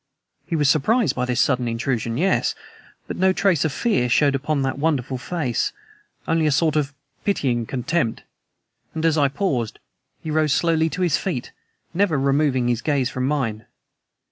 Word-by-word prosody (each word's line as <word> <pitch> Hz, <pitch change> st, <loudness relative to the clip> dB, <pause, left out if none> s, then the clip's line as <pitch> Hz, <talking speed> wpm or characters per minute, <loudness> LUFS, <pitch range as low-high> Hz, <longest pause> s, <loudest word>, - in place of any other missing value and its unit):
He 170 Hz, -, -1 dB
was 150 Hz, -3 st, +2 dB
surprised 215 Hz, -, +2 dB
by 125 Hz, -, -1 dB
this 125 Hz, -2 st, -1 dB
sudden 125 Hz, -3 st, +2 dB
intrusion 115 Hz, -1 st, -2 dB
yes, 185 Hz, +3 st, +1 dB, 0.5 s
but -, -, -6 dB
no 190 Hz, +1 st, +4 dB
trace 185 Hz, -5 st, +2 dB
of 160 Hz, -, 0 dB
fear 195 Hz, -, 0 dB
showed 140 Hz, +3 st, +3 dB
upon 140 Hz, +1 st, -1 dB
that 135 Hz, +1 st, -2 dB
wonderful 135 Hz, -4 st, 0 dB
face, 130 Hz, -5 st, -2 dB, 0.5 s
only 160 Hz, -1 st, +2 dB
a -, -, +2 dB
sort 155 Hz, +2 st, +2 dB
of 145 Hz, -2 st, 0 dB, 0.3 s
pitying 125 Hz, -, 0 dB
contempt. 130 Hz, -1 st, -1 dB, 0.7 s
And, 160 Hz, 0 st, -1 dB
as 160 Hz, -2 st, +3 dB
I 145 Hz, -3 st, +4 dB
paused, 135 Hz, -, -2 dB, 0.5 s
he 155 Hz, -, -4 dB
rose 155 Hz, -2 st, +2 dB
slowly 165 Hz, -1 st, +2 dB
to 180 Hz, +3 st, -2 dB
his 170 Hz, -5 st, +2 dB
feet, 155 Hz, -11 st, -4 dB, 0.4 s
never 180 Hz, -4 st, +2 dB
removing 135 Hz, -2 st, +2 dB
his 120 Hz, -1 st, 0 dB
gaze 140 Hz, -4 st, 0 dB
from 130 Hz, 0 st, -2 dB
mine. 115 Hz, -7 st, -2 dB
145 Hz, 170 wpm, -22 LUFS, 125-165 Hz, 0.7 s, no